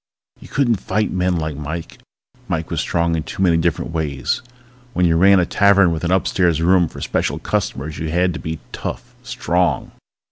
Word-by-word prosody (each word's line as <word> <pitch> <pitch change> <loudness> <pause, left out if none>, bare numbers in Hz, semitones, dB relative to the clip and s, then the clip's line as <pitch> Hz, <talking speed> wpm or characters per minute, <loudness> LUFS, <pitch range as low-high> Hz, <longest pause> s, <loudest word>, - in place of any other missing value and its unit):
You - - -13
couldn't 120 -6 +1
fight 105 +3 -1
men 90 -1 +1
like 80 -3 -2
Mike. 80 +3 -6 0.5
Mike - - -3
was - - 0
strong 85 0 0
in 80 - -1
too 80 +4 -4
many 85 -3 +4
different 85 0 -1
ways. 75 -5 -2 0.5
When 90 -2 +2
you 80 -1 +3
ran 95 +3 +6
a 90 - +2
tavern 100 -1 +4
with 80 0 -3
an 85 - 0
upstairs 90 -3 +2
room 90 +1 +4
for - - -10
special - - -1
customers 75 +3 -3
you 80 - -3
had 90 +2 +1
to 85 - -6
be 80 0 -4
tough, - - -6
strong. 90 0 -1
85 Hz, 185 wpm, -20 LUFS, 80-90 Hz, 0.5 s, ran